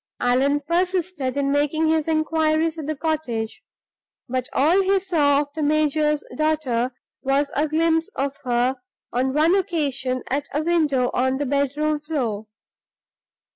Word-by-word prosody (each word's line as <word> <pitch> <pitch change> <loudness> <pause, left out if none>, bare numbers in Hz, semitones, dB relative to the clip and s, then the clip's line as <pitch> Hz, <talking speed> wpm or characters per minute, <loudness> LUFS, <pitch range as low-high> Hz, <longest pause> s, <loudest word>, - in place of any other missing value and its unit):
Allan 270 +4 +2
persisted 345 -4 -1
in 275 -1 +1
making 295 +2 +1
his 315 -1 +1
inquiries 315 0 +1
at 300 - -5
the 310 - -1
cottage; 275 -8 -3 0.7
but 255 0 -2
all 330 +8 +3
he 390 0 +2
saw 300 -7 +2
of 285 -1 -7
the 315 - -4
major's 300 0 +1
daughter 300 -6 0 0.3
was 275 +1 +1
a 300 +2 +1
glimpse 325 +2 +1
of 275 +1 -2
her 250 +1 +1 0.4
on 255 +2 +1
one 315 +3 +4
occasion 285 -9 -1
at 280 +2 -1
a 300 - +1
window 300 -7 +1
on 260 +1 +1
the 290 - -2
bedroom 285 +2 0
floor. 245 -9 -3
295 Hz, 140 wpm, -23 LUFS, 265-315 Hz, 0.7 s, one